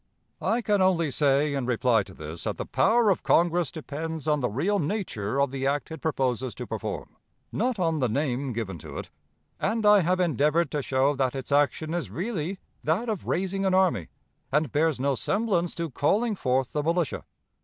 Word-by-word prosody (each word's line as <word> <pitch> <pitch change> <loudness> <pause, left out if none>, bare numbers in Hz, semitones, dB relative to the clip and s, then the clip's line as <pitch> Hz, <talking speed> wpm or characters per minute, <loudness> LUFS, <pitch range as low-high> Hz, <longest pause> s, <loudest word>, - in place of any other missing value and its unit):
"' - - -46
"I 235 +2 +1
can 205 -2 +2
only 170 -5 +3
say, 140 +1 +2
in 135 -3 -2
reply 120 -2 +3
to 95 -1 -11
this, 80 +1 -8
that - - -2
the - - -4
power 225 -2 +3
of 185 - 0
Congress 170 -1 +3
depends 160 0 -5
on 150 -1 +3
the 125 -3 0
real 180 - 0
nature 145 - -2
of 140 -2 +2
the 135 0 -2
act 145 +3 -1
it 160 - -7
proposes 130 - -1
to - - -6
perform, - - -5 0.3
not 245 +2 0
on 165 -4 +1
the 125 -3 +1
name 135 +1 -1
given 105 -7 -4
to - - -9
it; - - -7 0.5
and 220 +1 0
I 210 0 +7
have 180 +1 +1
endeavored 160 0 +2
to 150 - -1
show 135 +2 +2
that 130 -1 0
its 135 +1 -5
action 145 +3 +2
is 170 - -2
really 180 - -3 0.3
that 185 +10 0
of 210 -5 -3
'raising 195 +2 -1
an 190 -1 +2
army,' 180 - +2 0.4
and 150 -2 +1
bears 155 -2 +1
no 140 +1 +1
semblance 185 - 0
to 165 -3 -3
'calling 210 - +1
forth 130 -7 0
the 150 - 0
militia.' 165 0 0
155 Hz, 195 wpm, -26 LUFS, 135-185 Hz, 0.5 s, I